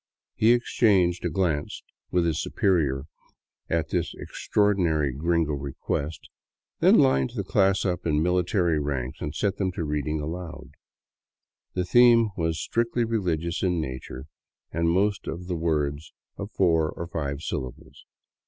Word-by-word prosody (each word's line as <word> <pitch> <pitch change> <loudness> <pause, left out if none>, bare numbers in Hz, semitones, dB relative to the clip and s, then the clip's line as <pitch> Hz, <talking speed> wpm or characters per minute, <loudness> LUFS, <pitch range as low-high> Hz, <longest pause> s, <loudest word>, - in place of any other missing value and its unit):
He 110 +2 +4
exchanged 100 -7 +2
a - - +1
glance 80 -4 -1 0.3
with 90 -1 +1
his 80 -3 0
superior 75 -9 +1 0.7
at 80 -1 0
this 85 -2 -1
extraordinary 85 -9 0
gringo 80 +2 0
re 70 -1 -5
quest, 75 +3 -3 0.5
then - - +6
lined 65 0 +3
the - - -2
class 95 0 +2
up 90 -2 -1
in 75 0 +2
military 90 -2 +1
ranks 70 -3 -3
and 75 +1 -4
set 100 +4 0
them 95 -2 0
to 85 - -3
reading 75 0 -2
aloud. 80 +2 -6 1.0
The 90 -1 0
theme 115 +2 +6
was 80 -1 -1
strictly 115 +1 0
religious 85 -7 -1
in 90 -3 +1
nature 65 -2 -6 0.5
and 85 +1 +1
most 100 +4 +1
of 90 +2 -5
the 90 -1 -3
words 75 -2 -1 0.2
of 100 - -6
four 85 -6 +2
or 85 - -6
five 75 -4 -4
syllables. 65 -5 -6
85 Hz, 145 wpm, -26 LUFS, 75-95 Hz, 1.0 s, then